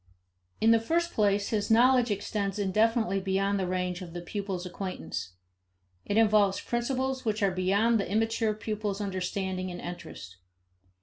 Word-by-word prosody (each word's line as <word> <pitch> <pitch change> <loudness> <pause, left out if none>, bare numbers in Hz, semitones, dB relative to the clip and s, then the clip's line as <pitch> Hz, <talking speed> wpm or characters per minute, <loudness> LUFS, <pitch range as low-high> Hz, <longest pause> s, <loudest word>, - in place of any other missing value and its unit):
In 225 - +5
the 230 - +5
first 340 +9 0
place, 205 -1 +2
his 210 -2 -1
knowledge 245 +2 +5
extends 205 -1 -2
indefinitely 215 +1 +2
beyond 195 +1 0
the 185 - -1
range 180 0 -2
of 170 -2 -8
the 175 - -5
pupil's 190 0 -4
acquaintance. 180 - -5 0.7
It 205 - -1
involves 210 -3 +4
principles 260 +2 -2
which 215 -3 -1
are 195 - +3
beyond 200 +5 +2
the 195 - -3
immature 225 0 +1
pupil's 210 -2 -3
understanding 190 -1 -3
and 175 0 -6
interest. 170 - -8
205 Hz, 145 wpm, -28 LUFS, 185-225 Hz, 0.7 s, In